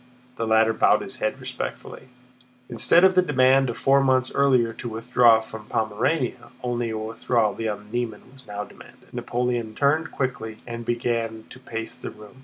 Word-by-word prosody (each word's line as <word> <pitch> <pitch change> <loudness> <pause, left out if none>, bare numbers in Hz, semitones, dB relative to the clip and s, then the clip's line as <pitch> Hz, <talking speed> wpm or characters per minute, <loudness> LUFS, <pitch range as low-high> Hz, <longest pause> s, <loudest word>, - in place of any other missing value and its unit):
The 115 -2 -3
latter 110 0 +4
bowed - - +3
his - - -6
head - - -2
respectfully. 130 - -6 0.6
Instead 145 +9 +4
of 190 0 +6
the 185 - +5
demand 135 -4 +3
of 120 - -4
four 135 0 +4
months 130 -1 +2
earlier 130 -5 +3
to 120 - -6
withdraw 115 0 +4
from 110 -1 -10
Pomerania, 115 +6 -1
only 120 -1 -1
a 110 - -3
withdrawal 110 0 0
beyond 105 -2 -5
the 120 - 0
Niemen 120 +1 -6
was 130 -1 -16
now 105 0 -4
demanded. - - -16
Napoleon 120 -2 -2
turned 155 +4 +2
quickly 110 -5 -3
and 120 -1 -6
began 115 -2 -1
to 130 - -11
pace 115 -3 -6
the - - -7
room. 105 +3 -14
120 Hz, 175 wpm, -24 LUFS, 110-130 Hz, 0.6 s, of